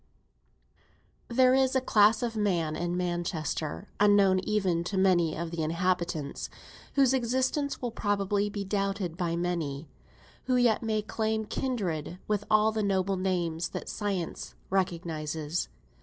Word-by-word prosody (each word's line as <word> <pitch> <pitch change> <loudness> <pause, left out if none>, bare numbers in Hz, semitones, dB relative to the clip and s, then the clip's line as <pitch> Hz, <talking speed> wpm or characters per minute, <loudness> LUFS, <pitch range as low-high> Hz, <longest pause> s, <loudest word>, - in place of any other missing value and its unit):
There 255 +1 +4
is 265 0 +3
a - - +5
class 220 -2 +4
of 230 -1 -2
men 175 -7 0
in 175 +2 -2
Manchester, 175 -1 -2
unknown 200 -2 +5
even 185 -4 0
to 195 +2 -2
many 175 -4 +3
of 170 0 -4
the 170 -1 -3
inhabitants, 170 -2 -1
and - - -19
whose 270 -2 +4
existence 260 +3 0
will 240 - -1
probably 205 -1 0
be 205 -1 -4
doubted 195 -3 -1
by 170 -2 -1
many, 165 -4 -2 0.6
who 255 - +2
yet 245 -3 +3
may 215 -2 -1
claim 220 0 -1
kindred 180 - -2
with 205 -1 0
all 215 +1 +4
the 220 0 -1
noble 195 -1 +1
names 175 -3 -1
that - - -6
science 195 -5 -3 0.2
recognises. 165 -4 -2
195 Hz, 140 wpm, -29 LUFS, 170-215 Hz, 0.6 s, a